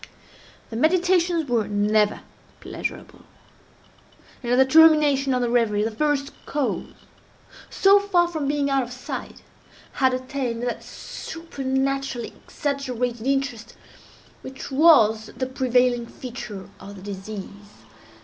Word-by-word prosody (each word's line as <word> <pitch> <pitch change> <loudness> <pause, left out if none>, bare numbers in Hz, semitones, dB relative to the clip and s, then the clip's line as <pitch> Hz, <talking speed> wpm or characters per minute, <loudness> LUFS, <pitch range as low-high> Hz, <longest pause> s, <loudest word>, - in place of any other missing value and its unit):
The - - -5
meditations 345 +2 +2
were 235 -4 0
never 210 0 +1 0.4
pleasurable; - - -6 1.2
and, 240 -2 -3
at - - +4
the 265 +1 +5
termination 300 -2 +5
of 250 -1 +1
the 240 - 0
reverie, 220 -4 +2
the 225 - -1
first 280 +4 0 0.2
cause, 285 -3 -2 0.8
so 395 +1 +5
far 370 -4 +2
from 315 -5 -3
being 285 0 0
out 275 -1 +2
of 245 -1 -6
sight, 250 0 -7 0.5
had 260 -2 +2
attained 255 -2 -4
that 245 -1 -3
supernaturally 275 -5 -4
exaggerated 250 -4 -4
interest 260 -4 -2 0.7
which 265 +1 -9
was 225 -8 +5
the 260 - -1
prevailing 250 -2 +1
feature 230 -7 -8
of 200 +1 -10
the 190 - -12
disease. 200 - -9
260 Hz, 120 wpm, -23 LUFS, 230-285 Hz, 1.2 s, the